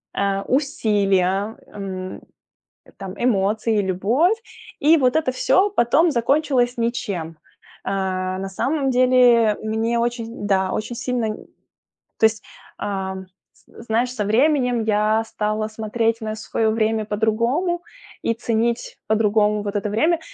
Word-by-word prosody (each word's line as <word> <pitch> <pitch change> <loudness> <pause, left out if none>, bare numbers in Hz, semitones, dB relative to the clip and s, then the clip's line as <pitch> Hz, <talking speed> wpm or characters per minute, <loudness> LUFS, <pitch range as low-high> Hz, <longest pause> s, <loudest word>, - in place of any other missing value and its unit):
Э, 195 0 0
усилия, 205 -6 +1
эм, 185 -2 -7 0.8
там, 190 -1 -7
эмоции 215 0 +1
и - - +2
любовь. 225 - +2 0.4
И 315 +3 +5
вот 255 -2 +2
это 295 -5 +1
всё 380 +9 +3
потом 315 +2 +3
закончилось 250 0 +1
ничем. 200 -9 -3 0.4
А, 185 -1 -2
на 195 0 -4
самом 270 +7 -1
деле 245 -3 +4
мне 225 +2 0
очень 235 -3 -3
да, 190 -1 +1
очень 215 +3 -3
сильно 250 -2 -2
н 215 - -3 0.8
то - - +5
есть, 220 0 -6 0.3
ам, 190 -1 -4 0.3
з - - -17
знаешь, 235 +2 0
со 210 - -1
временем 250 +1 +2
я 215 +1 +2
стала 215 -1 -2
смотреть 225 +1 -1
на 215 0 -3
своё 220 0 -1
время 220 0 +1
по-другому 235 - 0 0.4
и 230 - 0
ценить 235 - -1
по-другому 210 -1 +2
вот 205 0 -4
это 205 +1 -1
время. 315 +11 +2
220 Hz, 130 wpm, -21 LUFS, 205-245 Hz, 0.8 s, И